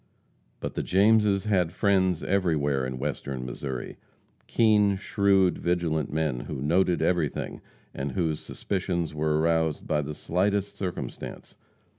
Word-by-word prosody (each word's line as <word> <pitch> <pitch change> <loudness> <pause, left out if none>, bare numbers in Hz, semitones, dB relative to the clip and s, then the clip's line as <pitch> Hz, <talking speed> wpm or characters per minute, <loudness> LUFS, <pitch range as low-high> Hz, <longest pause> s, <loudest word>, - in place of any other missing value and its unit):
But - - -4
the - - -2
Jameses 100 +1 +3
had 90 -6 +2
friends 95 -3 +2
everywhere 75 -9 +1
in 65 0 -5
Western 70 -2 -4
Missouri 65 0 -5 0.5
keen, 105 -3 +4
shrewd, 100 -2 +2
vigilant 85 -3 0
men, 75 -5 0
who 65 - -6
noted 85 +5 +2
everything, 85 -6 -1 0.3
and 70 0 -4
whose 80 -2 0
suspicions 90 -4 -3
were 75 0 +1
aroused 80 -1 +1
by 75 -1 +1
the 75 +1 -5
slightest 100 +4 0
circumstance. 95 -3 -6
85 Hz, 125 wpm, -27 LUFS, 75-95 Hz, 0.5 s, keen